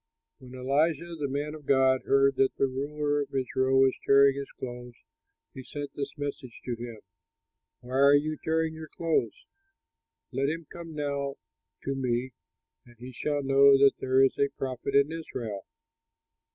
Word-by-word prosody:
When 130 Hz, 0 st, -12 dB
Elisha 155 Hz, +6 st, 0 dB
the 150 Hz, -3 st, -3 dB
man 145 Hz, +2 st, -3 dB
of 150 Hz, -3 st, -11 dB
God 130 Hz, -1 st, +4 dB
heard 135 Hz, 0 st, +3 dB
that 135 Hz, -, +2 dB
the -, -, +2 dB
ruler 145 Hz, +2 st, -1 dB
of 140 Hz, -, -6 dB
Israel 130 Hz, 0 st, +2 dB
was 135 Hz, -1 st, +4 dB
tearing 140 Hz, 0 st, +5 dB
his 140 Hz, 0 st, -5 dB
clothes, 125 Hz, -1 st, -7 dB, 0.6 s
he 130 Hz, -, -8 dB
sent 145 Hz, +2 st, -7 dB
this 140 Hz, +2 st, -5 dB
message 140 Hz, -4 st, -6 dB
to 125 Hz, -, -2 dB
him: 115 Hz, -2 st, -8 dB, 0.8 s
"Why 125 Hz, +2 st, -3 dB
are 140 Hz, +1 st, +7 dB
you 155 Hz, +2 st, +1 dB
tearing 160 Hz, 0 st, 0 dB
your 160 Hz, 0 st, -8 dB
clothes? 170 Hz, -, -2 dB, 0.9 s
Let 135 Hz, +2 st, 0 dB
him 165 Hz, +1 st, -4 dB
come 165 Hz, -2 st, -9 dB
now 140 Hz, -2 st, -2 dB, 0.5 s
to 135 Hz, -, -2 dB
me 130 Hz, -1 st, -1 dB, 0.5 s
and 120 Hz, -1 st, -19 dB
he 125 Hz, +2 st, -9 dB
shall 145 Hz, +3 st, -2 dB
know 135 Hz, 0 st, +6 dB
that 140 Hz, 0 st, +5 dB
there 130 Hz, +1 st, +3 dB
is 135 Hz, -, +1 dB
a 140 Hz, -, +3 dB
prophet 130 Hz, +1 st, -3 dB
in 140 Hz, +2 st, +4 dB
Israel!" 120 Hz, -11 st, -6 dB
140 Hz, 165 wpm, -28 LUFS, 130-145 Hz, 0.9 s, are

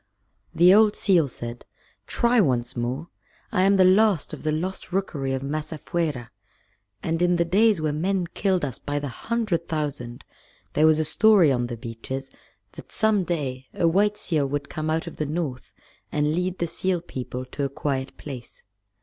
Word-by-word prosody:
The 180 Hz, +2 st, +7 dB
old 215 Hz, 0 st, +5 dB
seal 175 Hz, -7 st, +3 dB
said, 120 Hz, -1 st, -6 dB, 0.4 s
"Try 240 Hz, 0 st, +2 dB
once 125 Hz, -6 st, 0 dB
more. 130 Hz, +7 st, -3 dB, 0.4 s
I 185 Hz, -, +2 dB
am 195 Hz, +1 st, +4 dB
the 185 Hz, -, +6 dB
last 195 Hz, -1 st, +3 dB
of -, -, -7 dB
the 155 Hz, -, 0 dB
Lost 180 Hz, +5 st, -4 dB
Rookery 160 Hz, -8 st, -1 dB
of 135 Hz, 0 st, -2 dB
Masafuera, 150 Hz, -3 st, -3 dB, 0.7 s
and 165 Hz, +1 st, -1 dB
in 175 Hz, 0 st, +3 dB
the 170 Hz, 0 st, +2 dB
days 205 Hz, +3 st, +3 dB
when 155 Hz, 0 st, -1 dB
men 190 Hz, 0 st, +1 dB
killed 185 Hz, -5 st, +1 dB
us 130 Hz, -5 st, -6 dB
by 145 Hz, 0 st, -3 dB
the 145 Hz, -1 st, -3 dB
hundred 205 Hz, -, -2 dB
thousand 140 Hz, -6 st, -4 dB, 0.5 s
there 155 Hz, +1 st, +4 dB
was 155 Hz, -1 st, +5 dB
a 155 Hz, -, +1 dB
story 190 Hz, 0 st, +5 dB
on 125 Hz, -2 st, 0 dB
the 120 Hz, -1 st, -6 dB
beaches 120 Hz, +4 st, -6 dB, 0.4 s
that -, -, -12 dB
some 215 Hz, -3 st, +2 dB
day 135 Hz, -7 st, -3 dB
a 170 Hz, -, +2 dB
white 205 Hz, +5 st, +2 dB
seal 155 Hz, -8 st, 0 dB
would 145 Hz, +1 st, -3 dB
come 155 Hz, 0 st, -3 dB
out 160 Hz, +1 st, 0 dB
of 170 Hz, -, -8 dB
the 155 Hz, -, -1 dB
North 150 Hz, -5 st, -4 dB, 0.4 s
and 150 Hz, 0 st, +1 dB
lead 180 Hz, +2 st, -1 dB
the 170 Hz, -, 0 dB
seal 180 Hz, +2 st, -1 dB
people 130 Hz, -5 st, -6 dB
to 140 Hz, +3 st, -5 dB
a 140 Hz, -, 0 dB
quiet 135 Hz, -1 st, -3 dB
place. 130 Hz, -5 st, -9 dB
155 Hz, 180 wpm, -25 LUFS, 135-185 Hz, 0.7 s, The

